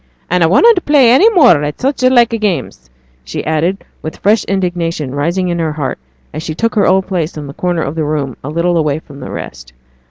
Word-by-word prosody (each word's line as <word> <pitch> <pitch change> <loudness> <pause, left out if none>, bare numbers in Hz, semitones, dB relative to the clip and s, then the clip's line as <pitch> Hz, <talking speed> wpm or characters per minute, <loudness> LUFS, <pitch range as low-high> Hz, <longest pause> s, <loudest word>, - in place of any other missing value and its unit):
'An' 180 0 +2
I 165 - +5
wunnot 400 - +4
play 275 -5 +4
any 370 - +6
more 290 - +4
at 145 0 -4
such 270 +1 -1
like 250 -2 +4
games,' 185 - -3 0.3
she 65 - -6
added, 165 +5 -1 0.2
with 155 - -7
fresh 210 +1 +2
indignation 175 -7 -2
rising 170 +6 -1
in 170 0 -2
her 160 -2 -1
heart 145 - -4 0.3
as 155 - -5
she 155 -1 -5
took 230 +5 -1
her 205 - +2
old 190 0 +2
place 170 -4 -3
in 150 - -6
the 140 - -9
corner 175 0 -2
of 140 - -4
the 160 -1 -2
room 145 -4 -2
a 140 - -5
little 170 +2 0
away 150 -3 0
from 145 -3 -12
the - - -8
rest. 60 0 -8
170 Hz, 220 wpm, -14 LUFS, 150-200 Hz, 0.3 s, any